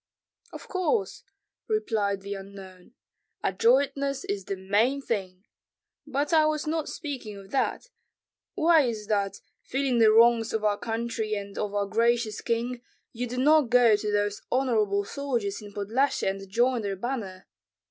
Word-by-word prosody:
"Of - - -10
course," 395 +3 -1 0.5
replied 215 - 0
the 200 +1 -5
unknown. 195 +1 -11 0.5
"Adroitness 275 +6 +2
is 200 -2 -3
the 195 - -3
main 205 +8 +1
thing! 195 -7 -4 0.6
But 290 +3 -1
I 310 -1 +5
was 305 0 -1
not 315 0 -2
speaking 255 -9 -6
of 195 0 -13
that. 270 - 0 0.7
Why 325 0 +5
is 225 -5 -2
it - - -21
that, 200 -2 -1 0.2
feeling 265 -2 0
the 220 -1 +6
wrongs 230 0 +5
of 220 -1 -1
our 205 -1 +1
country 225 -1 -2
and 200 -1 -6
of 205 -1 -3
our 200 0 +1
gracious 230 +1 +1
king, 240 +1 -2 0.3
you 245 +1 -3
do 250 +2 -6
not 295 0 +4
go 240 -3 +6
to 210 0 -2
those 205 0 0
honorable 215 -6 +1
soldiers 235 -7 -3
in 205 -1 -10
Podlyasye 220 +8 0
and 195 0 -3
join 240 +4 +2
their 200 -2 -3
banner? 195 -4 -5
225 Hz, 155 wpm, -27 LUFS, 200-265 Hz, 0.7 s, the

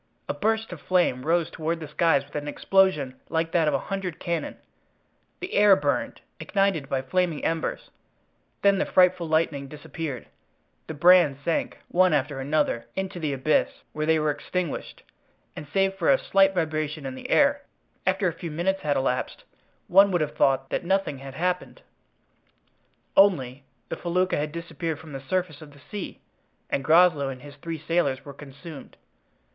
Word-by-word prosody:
A - - -1
burst 220 -2 -1
of 160 - -10
flame 165 -8 +1
rose 170 -1 +1
toward 165 +1 -2
the 155 - -7
skies 150 -1 +2
with 145 - -22
an 145 0 -3
explosion 150 -6 +1
like 165 0 -1
that 165 -3 +2
of - - +2
a - - -3
hundred 195 -4 -4
cannon; 170 -2 -3 0.8
the 375 - -6
air 205 -1 +6
burned, 145 -3 -2 0.2
ignited 195 -8 0
by 130 -1 -1
flaming 170 +2 -1
embers, 165 -1 -2 0.7
then 200 -1 +4
the - - +1
frightful 180 -2 +3
lightning 155 -3 0
disappeared, 150 -2 -6 0.6
the 160 - -6
brands 170 -3 +5
sank, 165 - -1
one 185 -1 +3
after 145 -1 0
another, 135 -4 0
into 190 -2 -4
the 155 -3 -1
abyss, 140 +3 +2 0.2
where 155 0 -2
they 160 0 +4
were 155 -1 +1
extinguished, 165 +3 -4 0.5
and 150 - -8
save 195 +2 +2
for 195 - 0
a 270 - +6
slight 195 -5 +3
vibration 155 -3 -2
in 135 - -4
the 130 - -8
air, 285 0 +4 0.5
after 190 0 +2
a 170 - -1
few 170 +1 -7
minutes 175 +5 -1
had 145 -1 0
elapsed 130 -1 -2 0.4
one 195 +2 +6
would 175 -3 +1
have 150 - -2
thought 135 0 +2
that - - -1
nothing 190 -6 0
had 135 0 -9
happened. 180 +3 -2 1.3
Only—the 135 -9 +1
felucca 180 +2 0
had 150 +1 -2
disappeared 165 -1 -4
from 160 -1 -12
the 135 - -6
surface 170 0 -2
of 150 -2 -12
the 140 - -18
sea 205 -3 -6 0.5
and 135 - 0
Groslow 160 -3 +4
and 130 0 -8
his 145 -1 -11
three 165 +3 -5
sailors 150 -4 -1
were 140 - -8
consumed. 140 +2 -11
160 Hz, 170 wpm, -25 LUFS, 145-180 Hz, 1.3 s, air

